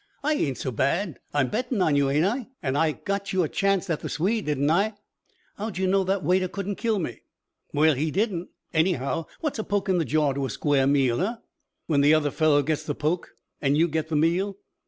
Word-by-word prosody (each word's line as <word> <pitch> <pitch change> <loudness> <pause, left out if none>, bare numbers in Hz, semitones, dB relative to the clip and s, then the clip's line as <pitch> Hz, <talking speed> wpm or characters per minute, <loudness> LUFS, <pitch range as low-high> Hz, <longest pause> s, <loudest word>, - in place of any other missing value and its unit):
"I 305 +2 +2
ain't 140 - -1
so 130 - -3
bad. 160 - 0
I'm 145 -3 +1
bettin' 245 +1 -1
on 155 -5 +3
you, 140 -1 +3
ain't 150 +4 +2
I? 235 +4 -1 0.2
An' 130 -2 0
I 155 +1 +2
got 200 +2 -3
you 185 -1 +3
a - - 0
chancet 195 0 +1
at 150 - -3
the - - -5
Swede, 195 +7 -1
didn't 145 0 +1
I?" 205 +6 +2 0.6
"How'd 210 -2 -4
you 190 - 0
know 190 +1 +3
that 190 0 -1
waiter 185 +4 +2
couldn't 200 +1 -4
kill 225 -2 0
me?" 175 - -4 0.5
"Well 155 +2 +4
he 150 +4 -1
didn't. 190 -1 -1 0.2
Anyhow, 160 -2 0
what's 300 -7 -2
a - - -1
poke 205 -1 -1
in 185 -2 +3
the - - +2
jaw 150 -2 +2
to 135 0 -2
a - - -7
square 135 +2 +1
meal, 135 -3 +2
eh?" 220 +6 0 0.5
"When 145 -4 +2
the 150 +2 +6
other 150 -2 +1
fellow 150 -2 +3
gets 155 +1 -1
the 145 - -4
poke 160 +4 -2 0.3
and 140 0 +2
you 165 +2 +4
get 160 -1 -2
the 160 - -1
meal. 180 +6 +1
165 Hz, 225 wpm, -25 LUFS, 145-195 Hz, 0.6 s, the